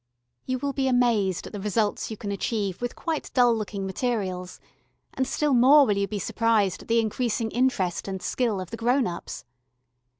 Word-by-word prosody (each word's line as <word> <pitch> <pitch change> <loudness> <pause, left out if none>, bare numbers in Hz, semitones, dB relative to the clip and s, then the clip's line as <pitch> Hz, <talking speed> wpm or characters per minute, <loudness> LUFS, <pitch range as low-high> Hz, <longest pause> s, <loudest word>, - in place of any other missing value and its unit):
You 255 0 0
will 280 +1 -3
be 270 0 0
amazed 235 -7 +2
at - - -10
the 205 - -5
results 210 +1 -1
you 220 - -6
can 200 -1 -5
achieve 200 -1 -2
with 245 0 -3
quite 320 -3 -3
dull 245 -2 +5
looking 205 -2 -4
materials, 190 -4 -3 0.5
and 260 -1 -1
still 295 -2 0
more 270 +4 +7
will 210 - +1
you 200 0 0
be 205 - -4
surprised 210 -2 +1
at - - -14
the 230 0 +3
increasing 225 0 -1
interest 230 -10 0
and 190 -1 -4
skill 225 +1 -1
of 185 -2 -7
the 230 - -5
grown 245 +3 +2
ups. 175 -3 -6
225 Hz, 190 wpm, -25 LUFS, 200-250 Hz, 0.5 s, more